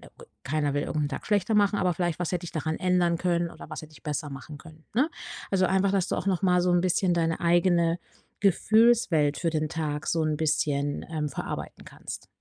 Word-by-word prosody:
na -, -, -14 dB
gut, -, -, -15 dB, 0.2 s
keiner 145 Hz, 0 st, 0 dB
will 145 Hz, -, +1 dB
irgend' 155 Hz, -, -2 dB
nen 145 Hz, -, -1 dB
Tag -, -, -6 dB
schlechter 210 Hz, +1 st, +1 dB
machen, 205 Hz, -1 st, +3 dB
aber 180 Hz, -, +2 dB
vielleicht 175 Hz, -2 st, -1 dB
„Was 175 Hz, -1 st, -2 dB
hätte 180 Hz, -1 st, -2 dB
ich 175 Hz, -, -7 dB
daran 155 Hz, 0 st, -2 dB
ändern 180 Hz, -2 st, +2 dB
können 170 Hz, -1 st, 0 dB
oder -, -, -11 dB
was -, -, -7 dB
hätte 155 Hz, 0 st, -12 dB
ich -, -, -17 dB
besser 150 Hz, 0 st, -3 dB
machen 140 Hz, +2 st, -8 dB
können,” 160 Hz, 0 st, -15 dB
ne? 285 Hz, +8 st, +2 dB, 0.4 s
Also, 185 Hz, -1 st, +3 dB
einfach, 190 Hz, +1 st, +2 dB
dass 195 Hz, -2 st, +1 dB
du -, -, -1 dB
auch -, -, -4 dB
noch 190 Hz, -3 st, +1 dB
mal 180 Hz, -2 st, +3 dB
so 180 Hz, -, +2 dB
'n 175 Hz, -, +4 dB
bisschen 180 Hz, 0 st, +2 dB
deine 165 Hz, -1 st, 0 dB
eigene 170 Hz, 0 st, +3 dB, 0.4 s
Gefühlswelt 200 Hz, -6 st, +4 dB
für 170 Hz, -, 0 dB
den 155 Hz, -1 st, -1 dB
Tag 150 Hz, -1 st, -3 dB
so 165 Hz, -1 st, +1 dB
'n 155 Hz, -1 st, 0 dB
bisschen, 145 Hz, -2 st, 0 dB
ähm, 155 Hz, -2 st, -2 dB
verarbeiten 135 Hz, -, -6 dB
kannst. -, -, -9 dB
170 Hz, 225 wpm, -27 LUFS, 155-185 Hz, 0.4 s, n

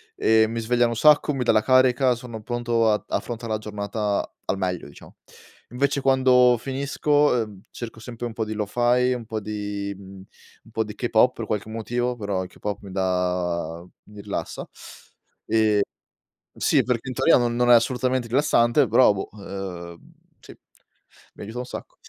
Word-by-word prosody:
E 110 Hz, 0 st, +4 dB
mi 115 Hz, +1 st, -4 dB
svegliano 120 Hz, +1 st, +1 dB
un -, -, -3 dB
sacco, 150 Hz, 0 st, +5 dB
mi 130 Hz, -2 st, -1 dB
dà 120 Hz, -, +3 dB
la 110 Hz, -1 st, +3 dB
carica, 130 Hz, -1 st, +4 dB
sono 115 Hz, -2 st, -8 dB
pronto 120 Hz, -1 st, 0 dB
ad 105 Hz, -, 0 dB
affrontare 115 Hz, -1 st, -4 dB
la -, -, 0 dB
giornata 105 Hz, -1 st, -3 dB
al 95 Hz, -, -1 dB
meglio, 90 Hz, -5 st, -3 dB
diciamo. 70 Hz, -, -15 dB, 0.6 s
Invece 140 Hz, +2 st, 0 dB
quando 130 Hz, -2 st, +4 dB
finisco, 135 Hz, +3 st, -4 dB, 0.4 s
uhm, 100 Hz, -3 st, -13 dB
cerco 115 Hz, -2 st, -8 dB
sempre 120 Hz, +1 st, -6 dB
un 115 Hz, -, -8 dB
po' 110 Hz, -1 st, -2 dB
di 110 Hz, -, -4 dB
lo-fi, 120 Hz, +4 st, +1 dB
un 120 Hz, -2 st, -6 dB
po' 110 Hz, -1 st, -4 dB
di 105 Hz, -1 st, -4 dB
un 95 Hz, +3 st, -16 dB
po' 110 Hz, 0 st, 0 dB
di 105 Hz, -1 st, -8 dB
K-pop 120 Hz, +1 st, +2 dB
per 115 Hz, -, -5 dB
qualche 105 Hz, +1 st, -3 dB
motivo 120 Hz, +2 st, -2 dB
però 100 Hz, -4 st, -2 dB
il 90 Hz, -, -9 dB
K-pop 105 Hz, +2 st, -5 dB
mi 100 Hz, -2 st, -10 dB
dà 90 Hz, -3 st, -1 dB, 0.2 s
mi 105 Hz, -1 st, -12 dB
rilassa. 100 Hz, 0 st, -5 dB, 0.8 s
E 110 Hz, -2 st, +3 dB, 0.7 s
sì, -, -, +2 dB
perché 125 Hz, 0 st, -2 dB
in 130 Hz, -, -4 dB
teoria 135 Hz, +5 st, +4 dB
no 120 Hz, -1 st, +1 dB
non 120 Hz, +1 st, +1 dB
è -, -, +9 dB
assolutamente 125 Hz, +1 st, +1 dB
rilassante, 130 Hz, 0 st, +3 dB
però 115 Hz, -1 st, +5 dB
boh, 95 Hz, -, -5 dB
uhm 95 Hz, -4 st, -7 dB, 0.4 s
sì, -, -, -14 dB, 0.8 s
mi -, -, -11 dB
aiuta 110 Hz, +4 st, -7 dB
un 125 Hz, -, -3 dB
sacco. -, -, -9 dB
115 Hz, 170 wpm, -24 LUFS, 100-125 Hz, 0.8 s, è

